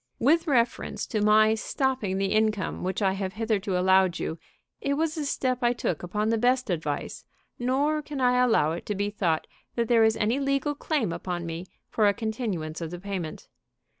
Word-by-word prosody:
"With 325 +7 +3
reference 245 -5 0
to 215 - -2
my 215 +1 +5
stopping 225 -4 -1
the 195 0 0
income 215 -2 0
which 190 +3 -1
I 190 - +3
have 190 -1 -3
hitherto 210 -4 -1
allowed 185 -1 +4
you, 160 - -4 0.4
it 280 0 0
was 315 +1 0
a 305 -2 -3
step 255 -2 0
I 240 0 +3
took 180 -9 -2
upon 210 +5 -1
the 225 0 +1
best 250 -1 +2
advice, 155 -4 -3 0.4
nor 280 +5 +1
can 290 -2 -6
I 250 -1 +4
allow 190 -11 +3
it 170 - -6
to 210 - -1
be 205 +1 -1
thought 175 -6 0 0.3
that 235 -1 0
there 230 -1 +5
is 220 0 +3
any 225 +5 +1
legal 275 +1 0
claim 280 - -1
upon 175 -1 -4
me 165 +2 -5 0.2
for 215 -2 +3
a 200 - +3
continuance 210 -9 -3
of 165 - -3
the 175 +1 -7
payment. 185 -5 -5
215 Hz, 195 wpm, -27 LUFS, 185-250 Hz, 0.4 s, my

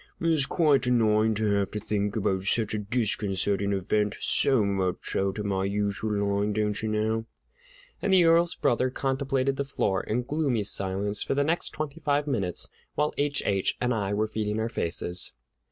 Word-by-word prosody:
"It's 160 -4 +2
quite 145 -7 +2
annoying 110 -2 +3
to 110 +1 -1
have 100 -1 0
to 105 - -4
think 105 -1 -2
about 95 -3 0
such 110 +1 +1
a 105 - -1
disconcerting 100 -2 0
event, 105 +2 0
so 130 -7 +3
much 95 -2 -2
out 95 +1 0
of 105 - -3
my 95 -1 0
usual 100 +1 -1 0.3
line, 105 +1 0
doncherknow." 110 +1 -1 0.7
And 200 - 0
the 185 -2 +6
Earl's 165 +1 +4
brother 125 +2 +1
contemplated 135 0 -1
the 140 - 0
floor 100 -8 -1
in 120 +3 -2
gloomy 135 -5 0
silence 100 +1 0
for - - -1
the 145 - +2
next 165 +4 0
twenty 155 0 -5
five 145 -2 +1
minutes, 100 - -1 0.3
while 150 0 0
H. 145 0 0
H. 95 -2 0
and 125 0 +1
I 100 -3 -1
were 110 +1 +1
feeding 105 0 -2
our 110 +1 -1
faces. 90 -3 -1
110 Hz, 170 wpm, -27 LUFS, 100-135 Hz, 0.7 s, the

